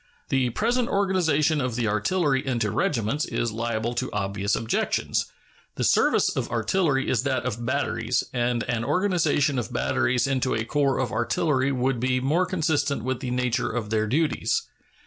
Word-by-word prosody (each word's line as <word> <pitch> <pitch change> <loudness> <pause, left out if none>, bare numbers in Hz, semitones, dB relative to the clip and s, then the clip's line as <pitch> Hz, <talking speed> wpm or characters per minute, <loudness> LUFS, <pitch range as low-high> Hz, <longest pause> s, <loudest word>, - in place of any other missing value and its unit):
The 130 -2 +2
present 235 - 0
organization 160 -6 +2
of 125 -3 -2
the 120 -2 0
artillery 135 - +1
into 120 -5 -1
regiments 115 +6 0
is 120 - -2
liable 115 +1 -2
to 120 - -3
obvious 100 0 -1
objections. 115 0 -1 0.5
The - - -2
service - - +3
of - - -2
artillery 135 - +1
is 120 - +1
that 130 -3 -1
of 120 -1 -3
batteries, 130 -2 0
and 120 -1 0
an 120 -1 -2
organization 155 -3 +1
of 120 +1 -5
batteries 120 0 +1
into 130 -1 0
a 110 0 -2
corps 140 +1 +1
of 130 - -1
artillery 130 +4 +1
would 130 -1 0
be 130 +1 +1
more 155 +8 +1
consistent 155 - 0
with 130 0 -2
the 130 - -4
nature 125 0 0
of 110 -2 -4
their 110 -1 +1
duties. 160 - 0
130 Hz, 165 wpm, -25 LUFS, 120-145 Hz, 0.5 s, service